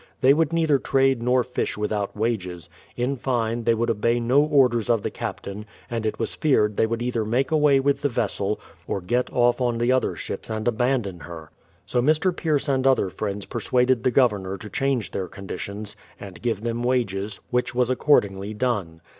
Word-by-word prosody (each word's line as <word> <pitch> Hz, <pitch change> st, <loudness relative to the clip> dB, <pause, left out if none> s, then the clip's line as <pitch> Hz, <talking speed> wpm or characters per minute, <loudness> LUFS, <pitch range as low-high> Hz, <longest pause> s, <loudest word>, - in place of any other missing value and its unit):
They 135 Hz, +1 st, +6 dB
would 160 Hz, +1 st, +1 dB
neither 160 Hz, -4 st, +2 dB
trade 135 Hz, -2 st, +2 dB
nor 125 Hz, +1 st, +2 dB
fish 125 Hz, -3 st, -3 dB
without 105 Hz, -1 st, -2 dB
wages; 90 Hz, -6 st, -2 dB, 0.3 s
in 125 Hz, +3 st, -1 dB
fine, 120 Hz, -2 st, -1 dB
they 115 Hz, -, +4 dB
would 115 Hz, +1 st, 0 dB
obey 115 Hz, +2 st, +1 dB
no 125 Hz, +4 st, +3 dB
orders 130 Hz, -7 st, +3 dB
of 115 Hz, -4 st, +2 dB
the -, -, -2 dB
captain, 105 Hz, +2 st, -6 dB, 0.2 s
and 115 Hz, -2 st, -1 dB
it 110 Hz, -, -2 dB
was 115 Hz, -, -2 dB
feared 105 Hz, -9 st, +2 dB
they 110 Hz, -, +2 dB
would 115 Hz, +1 st, -2 dB
either 120 Hz, -2 st, -1 dB
make 125 Hz, +6 st, 0 dB
away 150 Hz, -3 st, +4 dB
with 140 Hz, +1 st, +1 dB
the 145 Hz, -, +1 dB
vessel, 105 Hz, -3 st, -1 dB, 0.3 s
or -, -, -1 dB
get 120 Hz, +8 st, -1 dB
off 120 Hz, +1 st, +2 dB
on 120 Hz, -2 st, +1 dB
the 120 Hz, +2 st, +2 dB
other 130 Hz, 0 st, +1 dB
ships -, -, -6 dB
and 110 Hz, +1 st, -3 dB
abandon 120 Hz, -6 st, 0 dB
her. 80 Hz, +1 st, -10 dB, 0.3 s
So 125 Hz, -, 0 dB
Mr. 155 Hz, +6 st, +2 dB
Pierce 155 Hz, -4 st, 0 dB
and 135 Hz, -1 st, +2 dB
other 130 Hz, -8 st, +3 dB
friends 100 Hz, 0 st, -4 dB
persuaded 125 Hz, -1 st, +1 dB
the 130 Hz, -, +2 dB
Governor 105 Hz, -7 st, +1 dB
to 105 Hz, +2 st, -10 dB
change 135 Hz, -5 st, -1 dB
their 95 Hz, -, -3 dB
conditions, 100 Hz, +2 st, -7 dB, 0.2 s
and 95 Hz, -3 st, -10 dB
give 115 Hz, -4 st, -1 dB
them 120 Hz, +1 st, -2 dB
wages; 110 Hz, -5 st, -1 dB
which 125 Hz, 0 st, 0 dB
was 125 Hz, 0 st, +2 dB
accordingly 105 Hz, -7 st, +2 dB
done. 100 Hz, -9 st, -2 dB
120 Hz, 190 wpm, -24 LUFS, 105-130 Hz, 0.3 s, They